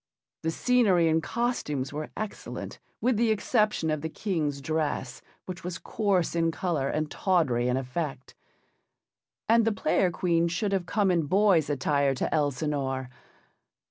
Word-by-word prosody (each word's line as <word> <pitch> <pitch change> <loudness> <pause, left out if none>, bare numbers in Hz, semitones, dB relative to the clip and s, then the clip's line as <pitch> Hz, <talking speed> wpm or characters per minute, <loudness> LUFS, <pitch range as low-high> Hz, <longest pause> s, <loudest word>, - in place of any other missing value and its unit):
The 160 - -1
scenery 195 -3 +3
and 160 0 +2
costumes 150 - -2
were 150 +1 -4
excellent 215 -1 -6 0.2
with 245 -2 +2
the 230 0 +2
exception 215 -6 +1
of 155 -1 -1
the 160 - -3
King's 155 -7 -2
dress, 145 -3 -2 0.2
which 185 0 -7
was 180 0 -4
coarse 195 -6 0
in 165 -1 +2
colour 160 -5 -1
and 155 0 -2
tawdry 150 - +1
in 125 +1 +1
effect. 135 +1 -4 1.1
And 230 +1 +5
the 225 - +2
Player 195 -2 +1
Queen 170 -1 +1
should 180 +4 -1
have 190 -3 -1
come 200 -3 +2
in 165 -4 +1
boy's 190 -3 +3
attire 140 0 +1
to - - -2
Elsinore. 140 -3 -1
165 Hz, 145 wpm, -27 LUFS, 145-195 Hz, 1.1 s, And